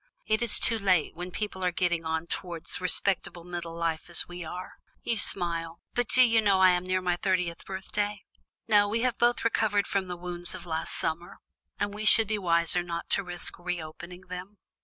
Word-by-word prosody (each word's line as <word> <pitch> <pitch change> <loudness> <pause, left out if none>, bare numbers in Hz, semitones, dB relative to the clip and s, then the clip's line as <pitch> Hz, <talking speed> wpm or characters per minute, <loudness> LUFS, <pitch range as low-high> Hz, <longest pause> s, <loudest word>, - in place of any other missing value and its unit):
It 215 +1 +1
is 235 -2 +3
too 225 -1 +3
late, 185 -6 +2
when 175 +1 -6
people 190 0 -4
are 180 - +2
getting 175 -2 0
on 160 +1 -1
towards 170 -1 -4
respectable 180 -1 0
middle 170 -1 -6
life 165 -1 -2
as 175 - +4
we 175 0 -7
are. 180 +3 -8 0.2
You 235 - 0
smile, 170 -5 0
but 245 -2 0
do 255 - +6
you 225 -1 +3
know 200 -3 +3
I 185 -1 +7
am 180 0 0
near 185 0 +1
my 175 -1 +1
thirtieth 180 -3 -1
birthday? 200 +2 -3 0.4
No, 205 -2 +5
we 225 +3 -1
have 250 -1 0
both 240 0 +2
recovered 210 -3 +2
from 195 -2 -1
the 180 -1 -5
wounds 175 0 -2
of - - -9
last 160 -1 -3
summer, 170 +2 -3 0.4
and 205 0 -1
we 210 +1 -5
should 220 0 +6
be 215 0 -1
wiser 170 -1 +3
not 170 -1 -6
to - - +2
risk 175 -1 -2
reopening 175 0 -6
them." 185 +2 -9
180 Hz, 200 wpm, -28 LUFS, 170-205 Hz, 0.4 s, I